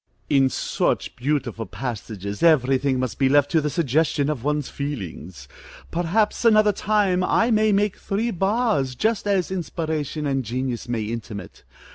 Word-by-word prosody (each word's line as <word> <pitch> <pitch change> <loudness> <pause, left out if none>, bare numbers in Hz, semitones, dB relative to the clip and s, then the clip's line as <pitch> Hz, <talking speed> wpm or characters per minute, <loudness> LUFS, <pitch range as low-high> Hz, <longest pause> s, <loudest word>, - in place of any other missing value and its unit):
In 135 -2 +4
such - - -1
beautiful 125 -4 -2
passages, 105 -3 -5
every 135 -6 +4
thing 135 -1 0
must 130 -1 -3
be 135 -1 +3
left 145 0 +3
to 160 -2 +3
the 150 - -1
suggestion 150 -1 +1
of 130 -6 -5
one's 150 -1 0
feelings. 95 - -6 0.4
Perhaps 175 +8 0
another 215 -2 +5
time 195 -3 +1
I 230 +5 +2
may 215 -1 +3
make 205 0 +1
three 220 +4 -2
bars, 195 - 0
just 220 - 0
as 190 -3 +1
inspiration 155 -4 -3
and 135 -2 0
genius 125 +1 -3
may 115 -3 -1
intimate. 105 -3 -7
145 Hz, 150 wpm, -23 LUFS, 125-190 Hz, 0.4 s, another